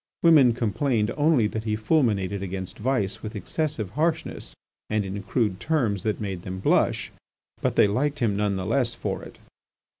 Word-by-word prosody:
Women 150 Hz, -8 st, +7 dB
complained 115 Hz, 0 st, 0 dB
only 145 Hz, -6 st, +3 dB
that 110 Hz, +1 st, -3 dB
he 105 Hz, -1 st, 0 dB
fulminated 105 Hz, -, +1 dB
against 95 Hz, -1 st, -5 dB
vice 110 Hz, -4 st, -1 dB
with 110 Hz, 0 st, -6 dB
excessive 125 Hz, -, -2 dB
harshness 160 Hz, +7 st, -2 dB, 0.3 s
and 110 Hz, -1 st, 0 dB
in 100 Hz, +1 st, -4 dB
crude 100 Hz, -1 st, -1 dB
terms 120 Hz, -, 0 dB
that 110 Hz, -1 st, -1 dB
made 95 Hz, -4 st, -4 dB
them 95 Hz, +1 st, -6 dB
blush. -, -, +1 dB, 0.5 s
But -, -, 0 dB
they -, -, +6 dB
liked 140 Hz, +8 st, 0 dB
him 110 Hz, -6 st, +1 dB
none 105 Hz, -1 st, 0 dB
the 95 Hz, -1 st, -3 dB
less 120 Hz, +2 st, +1 dB
for -, -, -3 dB
it. -, -, -12 dB
110 Hz, 170 wpm, -25 LUFS, 100-130 Hz, 0.5 s, Women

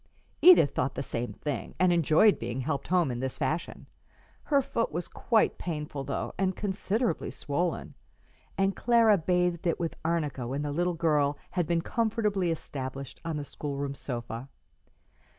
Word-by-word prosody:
Edith 350 Hz, -, +8 dB
thought 130 Hz, +1 st, -1 dB
the 135 Hz, -, -2 dB
same 120 Hz, -3 st, -3 dB
thing, 140 Hz, +7 st, -5 dB
and 185 Hz, -1 st, +4 dB
enjoyed 170 Hz, +5 st, +4 dB
being 120 Hz, +2 st, -3 dB
helped 140 Hz, 0 st, -2 dB
home 175 Hz, -6 st, +2 dB
in 120 Hz, -, -4 dB
this 130 Hz, 0 st, -3 dB
fashion. 155 Hz, +4 st, -2 dB, 0.6 s
Her 285 Hz, -2 st, +3 dB
foot 235 Hz, -3 st, -1 dB
was 170 Hz, +3 st, -3 dB
quite 225 Hz, -2 st, +1 dB
painful, 150 Hz, -4 st, -4 dB
though, 135 Hz, -, -3 dB
and 190 Hz, -1 st, +1 dB
considerably 205 Hz, +1 st, -1 dB
swollen; 170 Hz, +5 st, -2 dB, 0.6 s
and 195 Hz, 0 st, +2 dB
Clara 230 Hz, -4 st, +4 dB
bathed 180 Hz, +1 st, +1 dB
it 170 Hz, -, +1 dB
with 165 Hz, -2 st, -2 dB
arnica 150 Hz, -6 st, -1 dB
when 140 Hz, +4 st, -2 dB
the 145 Hz, -, -2 dB
little 175 Hz, +3 st, 0 dB
girl 150 Hz, -3 st, +2 dB
had 175 Hz, -4 st, 0 dB
been 170 Hz, 0 st, +1 dB
comfortably 210 Hz, -5 st, 0 dB
established 135 Hz, -4 st, -5 dB
on 165 Hz, -2 st, -3 dB
the 145 Hz, -, -4 dB
schoolroom 140 Hz, 0 st, -4 dB
sofa. 120 Hz, -1 st, -6 dB
160 Hz, 155 wpm, -29 LUFS, 140-185 Hz, 0.6 s, Edith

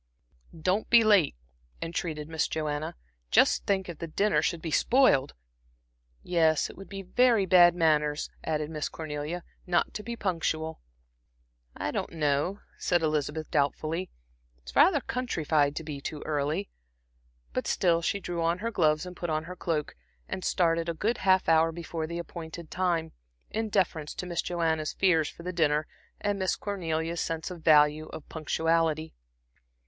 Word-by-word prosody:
"Don't 185 Hz, +6 st, 0 dB
be 235 Hz, -1 st, +7 dB
late," 205 Hz, -, +4 dB, 0.4 s
entreated 160 Hz, -2 st, -3 dB
Miss 160 Hz, 0 st, 0 dB
Joanna. 150 Hz, -1 st, -3 dB, 0.3 s
"Just -, -, +4 dB
think 190 Hz, -2 st, +1 dB
if 170 Hz, -3 st, -8 dB
the 165 Hz, -, -4 dB
dinner 200 Hz, +6 st, +2 dB
should 170 Hz, -, 0 dB
be 160 Hz, 0 st, -5 dB
spoiled!" 230 Hz, -, +3 dB, 0.9 s
"Yes, 160 Hz, -3 st, +2 dB
it -, -, -16 dB
would 195 Hz, -, -11 dB
be 195 Hz, -1 st, -6 dB
very 230 Hz, +2 st, +3 dB
bad 175 Hz, -1 st, +6 dB
manners," 150 Hz, -3 st, +2 dB, 0.2 s
added 155 Hz, 0 st, -2 dB
Miss 155 Hz, -2 st, -3 dB
Cornelia 155 Hz, +2 st, -5 dB, 0.2 s
"not 175 Hz, -1 st, +1 dB
to -, -, -4 dB
be 235 Hz, +3 st, -5 dB
punctual." 160 Hz, -5 st, -2 dB, 1.0 s
"I -, -, -2 dB
don't -, -, -3 dB
know," 150 Hz, +5 st, 0 dB, 0.2 s
said 175 Hz, -2 st, +1 dB
Elizabeth, 155 Hz, 0 st, -1 dB
doubtfully. 155 Hz, +5 st, 0 dB, 0.5 s
"It's -, -, -13 dB
rather -, -, +5 dB
countrified 155 Hz, -, 0 dB
to 160 Hz, -, -4 dB
be 150 Hz, -3 st, -6 dB
too 150 Hz, +1 st, -5 dB
early." 145 Hz, -, -1 dB, 0.8 s
But -, -, -2 dB
still 170 Hz, -2 st, +2 dB
she 200 Hz, +4 st, 0 dB
drew 175 Hz, -3 st, -4 dB
on 165 Hz, +1 st, +1 dB
her 230 Hz, +4 st, -3 dB
gloves 155 Hz, -4 st, +2 dB
and 180 Hz, 0 st, -8 dB
put 175 Hz, -1 st, -4 dB
on 155 Hz, 0 st, 0 dB
her 180 Hz, +2 st, -8 dB
cloak, 160 Hz, -4 st, -2 dB, 0.3 s
and 185 Hz, -, -5 dB
started 165 Hz, -1 st, +1 dB
a 170 Hz, -, -2 dB
good 220 Hz, +8 st, -1 dB
half 190 Hz, -1 st, +3 dB
hour 165 Hz, 0 st, +4 dB
before 165 Hz, -1 st, -5 dB
the 170 Hz, +1 st, -5 dB
appointed 170 Hz, -1 st, -7 dB
time, 170 Hz, -3 st, 0 dB, 0.4 s
in 220 Hz, 0 st, -2 dB
deference 170 Hz, -7 st, 0 dB
to -, -, -4 dB
Miss 170 Hz, -1 st, -1 dB
Joanna's 160 Hz, -3 st, -1 dB
fears 165 Hz, -5 st, +3 dB
for 170 Hz, -, -12 dB
the 180 Hz, +1 st, -4 dB
dinner 155 Hz, -3 st, +2 dB, 0.3 s
and 205 Hz, -1 st, -1 dB
Miss 185 Hz, -1 st, +1 dB
Cornelia's 165 Hz, -4 st, -2 dB
sense 165 Hz, +2 st, -3 dB
of 180 Hz, -, -6 dB
the 160 Hz, -, 0 dB
value 150 Hz, 0 st, +5 dB
of 150 Hz, -, -9 dB
punctuality. 160 Hz, 0 st, 0 dB
165 Hz, 165 wpm, -28 LUFS, 155-180 Hz, 1.0 s, be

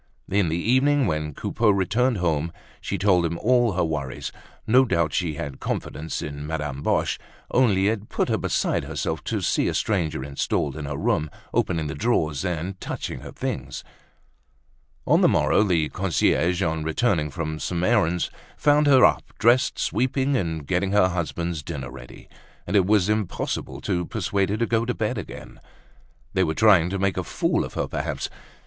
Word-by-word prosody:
In 100 Hz, -3 st, +2 dB
the 80 Hz, -, 0 dB
evening, 130 Hz, +8 st, +3 dB
when 75 Hz, -4 st, -2 dB
Coupeau 115 Hz, -2 st, 0 dB
returned 105 Hz, +5 st, +2 dB
home, 85 Hz, -2 st, 0 dB, 0.3 s
she 100 Hz, -, -3 dB
told 95 Hz, -2 st, +3 dB
him 85 Hz, 0 st, -1 dB
all 120 Hz, 0 st, +3 dB
her 90 Hz, -, +1 dB
worries; 75 Hz, -5 st, -3 dB, 0.3 s
no 125 Hz, +4 st, +5 dB
doubt 85 Hz, -, 0 dB
she 80 Hz, +2 st, -1 dB
had 70 Hz, -2 st, -6 dB
confidence 80 Hz, +1 st, -4 dB
in 75 Hz, 0 st, -6 dB
Madame 75 Hz, -3 st, -3 dB
Boche, -, -, 0 dB, 0.3 s
only 100 Hz, -6 st, +3 dB
it 110 Hz, -1 st, -2 dB
put -, -, 0 dB
her -, -, 0 dB
beside -, -, 0 dB
herself -, -, -3 dB
to -, -, -1 dB
see -, -, +1 dB
a -, -, -1 dB
stranger 85 Hz, -10 st, 0 dB
installed 70 Hz, 0 st, -1 dB
in 75 Hz, -2 st, -5 dB
her 70 Hz, 0 st, -4 dB
room, 75 Hz, +2 st, 0 dB, 0.2 s
opening 80 Hz, -3 st, 0 dB
the 75 Hz, -, -3 dB
drawers, 75 Hz, -, 0 dB
and 90 Hz, +1 st, -3 dB
touching -, -, -4 dB
her -, -, -9 dB
things. 65 Hz, 0 st, -4 dB, 1.2 s
On -, -, +4 dB
the -, -, +6 dB
morrow -, -, +3 dB
the 85 Hz, -7 st, +2 dB
concierge, 90 Hz, 0 st, +1 dB
on 80 Hz, -2 st, -1 dB
returning 80 Hz, -1 st, +1 dB
from 80 Hz, +2 st, -4 dB
some 85 Hz, +1 st, -2 dB
errand, 90 Hz, -6 st, +2 dB, 0.3 s
found 150 Hz, 0 st, +4 dB
her 130 Hz, -3 st, +7 dB
up, -, -, +3 dB, 0.2 s
dressed, 120 Hz, +3 st, +3 dB
sweeping 135 Hz, +2 st, 0 dB
and 80 Hz, -, -2 dB
getting 95 Hz, +4 st, 0 dB
her 100 Hz, -3 st, +5 dB
husband's 85 Hz, -2 st, -3 dB
dinner 70 Hz, -3 st, -6 dB
ready; 60 Hz, -2 st, -12 dB, 0.4 s
and 95 Hz, -, -2 dB
it 95 Hz, -2 st, +4 dB
was 105 Hz, -3 st, +3 dB
impossible 105 Hz, -3 st, -2 dB
to 90 Hz, -1 st, -1 dB
persuade 100 Hz, -3 st, -1 dB
her 105 Hz, -, 0 dB
to 115 Hz, -, +1 dB
go 115 Hz, 0 st, +1 dB
to 125 Hz, +1 st, -2 dB
bed 110 Hz, +1 st, -1 dB
again. 100 Hz, -, -9 dB, 0.7 s
They 95 Hz, -, +3 dB
were 80 Hz, -2 st, -1 dB
trying 95 Hz, -6 st, +5 dB
to 100 Hz, -, -2 dB
make 95 Hz, 0 st, 0 dB
a -, -, 0 dB
fool -, -, 0 dB
of -, -, -8 dB
her -, -, -1 dB
perhaps! -, -, -3 dB
90 Hz, 180 wpm, -24 LUFS, 80-110 Hz, 1.2 s, her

